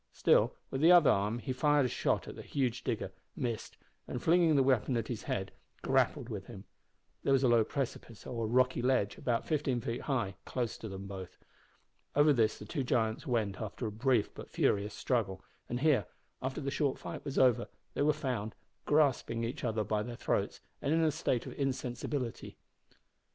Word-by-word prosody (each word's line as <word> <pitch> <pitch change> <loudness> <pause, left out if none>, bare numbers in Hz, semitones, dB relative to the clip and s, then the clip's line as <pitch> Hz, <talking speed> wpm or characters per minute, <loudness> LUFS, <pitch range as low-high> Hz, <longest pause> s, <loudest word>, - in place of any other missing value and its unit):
Still, - - +3 0.2
with 135 - -2
the 165 +3 +7
other 175 -5 +8
arm 105 +3 +1
he 130 +2 -3
fired 145 +1 +3
a - - +2
shot - - 0
at - - -7
the - - -8
huge 125 -4 -1
digger, - - -2 0.2
missed, 115 -3 -4 0.3
and, 125 - -3
flinging 165 +1 +4
the 135 - +5
weapon 130 -1 +2
at 115 - -3
his 120 -4 -3
head, 95 0 -3 0.3
grappled - - +2
with - - -6
him. - - -9 0.6
There 135 - +2
was 135 0 +3
a - - +5
low 120 -2 +5
precipice 120 -2 -5
or 115 -3 -3
rocky 125 +1 +3
ledge, 125 -5 +1
about 120 -2 0
fifteen 145 -5 0
feet 115 +1 -3
high, 115 -10 -1
close 120 -3 -2
to 110 - -6
them. 95 0 -7 1.1
Over 145 +1 +6
this 110 -4 +2
the - - -9
two 150 - -3
giants 115 +2 0
went 110 -6 0
after 110 +3 -4
a 110 - -2
brief 115 0 +1
but - - -9
furious 105 +1 +1
struggle, 100 -7 -1 0.3
and 120 +1 -2
here, 150 -3 +3 0.3
after 130 +3 -3
the 140 -1 -2
short 140 -2 0
fight - - -7
was 140 -2 -5
over, 125 -3 +4 0.3
they - - -2
were 150 +1 +5
found, 125 -8 -3 0.3
grasping 135 -6 +2
each 115 +3 -4
other 110 -1 0
by 105 +1 0
their 120 +2 -5
throats, - - -1 0.2
and 145 +3 +1
in 165 - +3
a 155 - +3
state 125 -4 -1
of - - -7
insensibility. 130 -1 -3
125 Hz, 190 wpm, -32 LUFS, 110-140 Hz, 1.1 s, other